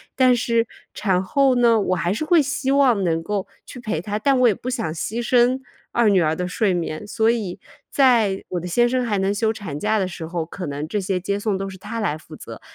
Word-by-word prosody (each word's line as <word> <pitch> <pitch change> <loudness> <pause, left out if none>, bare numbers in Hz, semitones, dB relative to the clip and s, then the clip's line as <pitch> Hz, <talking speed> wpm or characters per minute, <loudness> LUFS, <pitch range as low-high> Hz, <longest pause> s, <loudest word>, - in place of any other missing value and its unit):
但 255 -1 +5
是 230 -1 +1 0.3
产 190 -3 +1
后 265 +8 +2
呢， 235 -2 +4
我 185 -2 0
还 175 0 -1
是 220 +10 -2
会 335 0 +5
希 285 -1 -1
望 260 -7 +3
能 165 -2 0
够 200 +3 -3 0.2
去 250 - -9
陪 215 -9 -3
她， 205 +3 -3
但 265 +4 +2
我 250 - +5
也 215 - +3
不 245 - -10
想 225 -10 -2
牺 215 +8 -3
牲 250 +1 +3 0.3
2 235 -2 +2
女 195 -3 +4
儿 155 -1 +1
的 180 +2 -3
睡 195 +1 0
眠。 170 +1 -3
所 220 +1 +1
以 205 -6 -3 0.3
在 230 -8 +3
我 180 - -2
的 175 - -6
先 240 +7 +3
生 255 +1 0
还 210 -3 0
能 195 +1 +1
休 220 +1 +1
产 185 -10 -6
假 215 +4 +1
的 190 - 0
时 175 -2 -7
候， 170 -1 -3
可 175 +1 -7
能 145 +2 -4
这 210 - -2
些 190 -1 -1
接 200 +2 -2
送 205 -2 -1
都 195 0 -4
是 190 - -10
他 230 +5 -6
来 175 -9 -1
负 155 - -13
责， - - -10
210 Hz, 260 characters per minute, -22 LUFS, 180-240 Hz, 0.3 s, 但